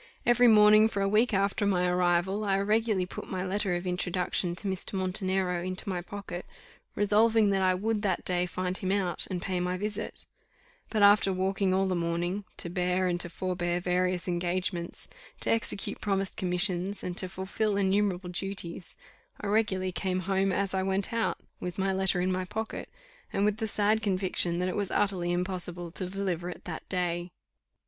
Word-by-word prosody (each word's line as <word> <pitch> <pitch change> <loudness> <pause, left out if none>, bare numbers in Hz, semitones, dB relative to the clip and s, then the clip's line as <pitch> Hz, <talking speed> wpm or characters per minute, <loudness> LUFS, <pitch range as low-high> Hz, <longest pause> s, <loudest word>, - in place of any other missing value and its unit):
Every 240 0 +5
morning 215 -1 +7
for 200 -3 -2
a - - +2
week 220 +5 +3
after 200 0 +1
my 185 -3 +2
arrival, 180 +3 +1
I 195 -2 +2
regularly 210 -1 +1
put - - -8
my 185 -1 -2
letter 195 -1 0
of 175 +1 -4
introduction 180 -1 -1
to 200 - -6
Mr. 190 +1 -3
Montenero 185 -1 0
into 185 +2 -4
my 185 -2 -2
pocket, 185 -1 -7 0.5
resolving 215 +1 +4
that 195 -1 +1
I 185 -1 +3
would 215 +3 -1
that 190 -4 -1
day 180 0 0
find 180 +1 -3
him 190 0 -2
out, 195 -3 0
and 185 -2 -2
pay 185 -2 -1
my 180 +1 -1
visit; 210 +2 -4 0.6
but 215 -2 +1
after 200 -1 +6
walking 190 +1 0
all 190 +1 +2
the 190 - 0
morning, 175 +3 -1
to - - 0
bear 180 +1 0
and 175 -1 0
to 175 - 0
forbear 175 0 -2
various 180 0 0
engagements, 175 0 -2 0.3
to - - +1
execute 210 -2 -1
promised 195 -2 -1
commissions, 185 +1 +1
and 180 - -3
to 185 - -2
fulfil 195 +2 -1
innumerable 190 -2 +1
duties, 180 -1 -3 0.4
I - - -6
regularly 200 -3 +1
came 185 +2 -1
home 195 +1 +1
as 195 +1 -1
I 190 - +1
went 195 +3 0
out, 230 -1 0 0.2
with 180 -1 -5
my 195 0 +1
letter 190 -1 +1
in 185 +1 +1
my 185 0 -1
pocket, 220 +4 -5 0.4
and 200 - +1
with 210 0 +1
the 220 - -2
sad 210 +1 +2
conviction 185 -4 +2
that 180 +1 0
it 185 - -2
was 200 -2 -1
utterly 185 -4 0
impossible 175 -1 -3
to 185 +1 -4
deliver 180 -2 -2
it 165 - -9
that 165 -3 -7
day. 175 -1 -1
190 Hz, 185 wpm, -29 LUFS, 180-200 Hz, 0.6 s, morning